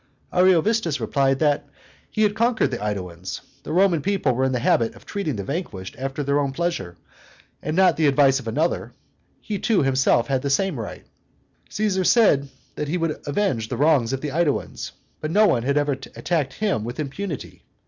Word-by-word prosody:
Ariovistus 180 Hz, -1 st, +3 dB
replied 135 Hz, -1 st, +1 dB
that 145 Hz, -1 st, +1 dB, 0.4 s
"he 215 Hz, -, 0 dB
had 210 Hz, -1 st, +3 dB
conquered 225 Hz, -, +1 dB
the 120 Hz, -, -3 dB
AEduans. 95 Hz, -4 st, -4 dB, 0.2 s
The -, -, -7 dB
Roman 175 Hz, -2 st, +3 dB
people 190 Hz, -7 st, +1 dB
were 130 Hz, +2 st, +1 dB
in 130 Hz, -, +1 dB
the 125 Hz, -, 0 dB
habit 115 Hz, -1 st, +1 dB
of -, -, -16 dB
treating 195 Hz, -, -3 dB
the 100 Hz, -, -4 dB
vanquished 105 Hz, -, -5 dB
after 135 Hz, +2 st, -4 dB
their 140 Hz, +1 st, +1 dB
own 140 Hz, -2 st, -1 dB
pleasure, 155 Hz, -, -3 dB, 0.6 s
and 155 Hz, +2 st, -3 dB
not 185 Hz, -3 st, +4 dB
the 160 Hz, -2 st, +3 dB
advice 135 Hz, -1 st, +4 dB
of 125 Hz, -, -10 dB
another; 155 Hz, +10 st, -1 dB, 0.5 s
he 205 Hz, -2 st, -4 dB
too, 220 Hz, -9 st, +2 dB
himself, 130 Hz, -3 st, +3 dB
had 135 Hz, -2 st, 0 dB
the 140 Hz, -, -2 dB
same 160 Hz, 0 st, +1 dB
right. 110 Hz, -, -7 dB, 0.6 s
Caesar 200 Hz, -3 st, 0 dB
said 160 Hz, -, +4 dB, 0.3 s
he 150 Hz, +4 st, -1 dB
would 165 Hz, -3 st, -2 dB
avenge 140 Hz, -, 0 dB
the 125 Hz, -, -3 dB
wrongs 145 Hz, -5 st, +3 dB
of 135 Hz, 0 st, -2 dB
the 150 Hz, -, -3 dB
AEduans; 155 Hz, -1 st, -1 dB, 0.3 s
but 155 Hz, -, -3 dB
no 210 Hz, +6 st, +5 dB
one 125 Hz, -, +3 dB
had 140 Hz, +4 st, 0 dB
ever 145 Hz, 0 st, +2 dB
attacked 135 Hz, +1 st, -2 dB
him 205 Hz, -, -1 dB
with 120 Hz, +6 st, -6 dB
impunity. 155 Hz, +2 st, -5 dB
145 Hz, 185 wpm, -23 LUFS, 130-180 Hz, 0.6 s, no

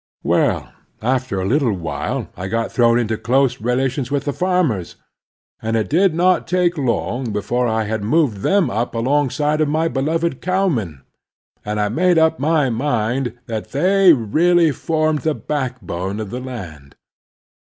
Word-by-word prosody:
Well, -, -, 0 dB, 0.3 s
after 130 Hz, -4 st, 0 dB
a 95 Hz, -, -2 dB
little 125 Hz, +1 st, +2 dB
while 85 Hz, -4 st, -4 dB
I 95 Hz, +1 st, -5 dB
got 115 Hz, +3 st, -2 dB
thrown 120 Hz, -1 st, +3 dB
into 110 Hz, -2 st, -1 dB
close 130 Hz, 0 st, +1 dB
relations 130 Hz, +2 st, -1 dB
with 140 Hz, -1 st, -1 dB
the 145 Hz, -, -1 dB
farmers, 180 Hz, -, 0 dB, 0.7 s
and 110 Hz, 0 st, -1 dB
it 110 Hz, -, -2 dB
did 180 Hz, +1 st, +3 dB
not 180 Hz, +2 st, +2 dB
take 180 Hz, 0 st, +1 dB
long 125 Hz, -3 st, -1 dB
before 110 Hz, +5 st, -1 dB
I 110 Hz, -1 st, 0 dB
had 110 Hz, 0 st, -3 dB
moved 130 Hz, -1 st, +1 dB
them 195 Hz, -, +1 dB
up 115 Hz, +4 st, -2 dB
alongside 145 Hz, +5 st, +1 dB
of 155 Hz, -, +2 dB
my 160 Hz, +2 st, +1 dB
beloved 160 Hz, +1 st, -1 dB
cowmen; 140 Hz, -, -1 dB, 0.6 s
and 105 Hz, 0 st, -3 dB
I 105 Hz, 0 st, +1 dB
made 175 Hz, -, +2 dB
up 160 Hz, 0 st, +3 dB
my 150 Hz, -2 st, +2 dB
mind 120 Hz, 0 st, -1 dB
that 110 Hz, -2 st, -6 dB
they 185 Hz, +5 st, +5 dB
really 160 Hz, +7 st, +3 dB
formed 155 Hz, +1 st, 0 dB
the 155 Hz, 0 st, -1 dB
backbone 120 Hz, -, -4 dB
of 105 Hz, -3 st, -5 dB
the 125 Hz, -, -4 dB
land. 85 Hz, -, -9 dB
130 Hz, 155 wpm, -19 LUFS, 110-160 Hz, 0.7 s, they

